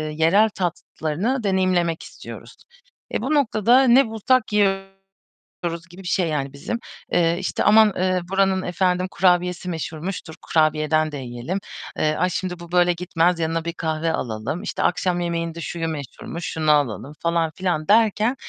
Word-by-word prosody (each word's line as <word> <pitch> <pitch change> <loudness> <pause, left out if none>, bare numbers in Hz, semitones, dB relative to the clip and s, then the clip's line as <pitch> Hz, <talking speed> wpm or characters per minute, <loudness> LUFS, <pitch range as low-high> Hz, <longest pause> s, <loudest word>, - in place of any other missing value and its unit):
yerel 180 +8 +4
tatlarını 180 - -2
deneyimlemek 185 -4 +1
istiyoruz. - - -11 0.6
Eee, - - -1
bu 270 +5 -1
noktada 245 -2 +4
ne 255 0 +5
bulsak 220 +1 +1
yiyoruz 195 -1 +1 0.9
gibi 185 +2 -12
bir - - -7
şey 180 -1 +1
yani 140 -3 -2
bizim. 230 +11 -4 0.3
Eee, 170 0 +2
işte, 190 - -2
"Aman, 215 0 +6
eee, 185 0 +1
buranın 190 -1 +2
efendim 180 0 0
kurabiyesi 180 0 +1
meşhurmuş, 165 +2 -5
dur 160 - -9
kurabiyeden 155 0 +1
de 145 - -5
yiyelim." 125 +8 -4 0.4
Eee, 155 0 +1
"Ay 180 +4 +1
şimdi 180 0 -3
bu 170 -1 -11
böyle 175 0 +4
gitmez, 175 0 +1
yanına 165 0 -1
bir 170 - -3
kahve 160 0 -1
alalım, 115 - -3
işte, - - -3
akşam 180 0 +1
yemeğinde 170 -1 -3
şuyu 165 0 -3
meşhurmuş, 160 +3 -6
şunu 155 -1 +1
alalım 145 -1 0
falan 170 -1 0
filan." 175 -5 -1
derken 220 +2 +3
175 Hz, 155 wpm, -22 LUFS, 160-195 Hz, 0.9 s, Aman